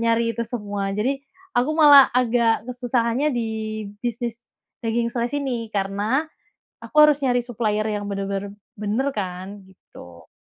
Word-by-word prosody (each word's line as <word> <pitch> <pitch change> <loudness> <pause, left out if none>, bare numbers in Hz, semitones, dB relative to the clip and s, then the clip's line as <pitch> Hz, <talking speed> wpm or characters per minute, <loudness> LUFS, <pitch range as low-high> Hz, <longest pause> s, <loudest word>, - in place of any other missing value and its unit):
nyari 230 0 +2
itu 235 - -1
semua. 205 -4 -3
Jadi 260 +6 0 0.4
aku 250 +5 +2
malah 290 -4 +8
agak 235 -2 +2
kesusahannya 245 +2 0
di 230 -2 -2 0.5
bisnis 235 -1 -4 0.4
daging 230 +1 0
slice 240 +2 -2
ini 255 -5 -2
karena 205 +8 0 0.6
aku - - -12
harus 295 - +2
nyari 245 -1 +2
supplier 215 -3 -1
yang 205 -1 -3
benar-benar 200 0 -3 0.3
benar 215 +7 0
kan 185 -2 -4 0.2
gitu. 85 - -15
230 Hz, 135 wpm, -23 LUFS, 205-245 Hz, 0.6 s, malah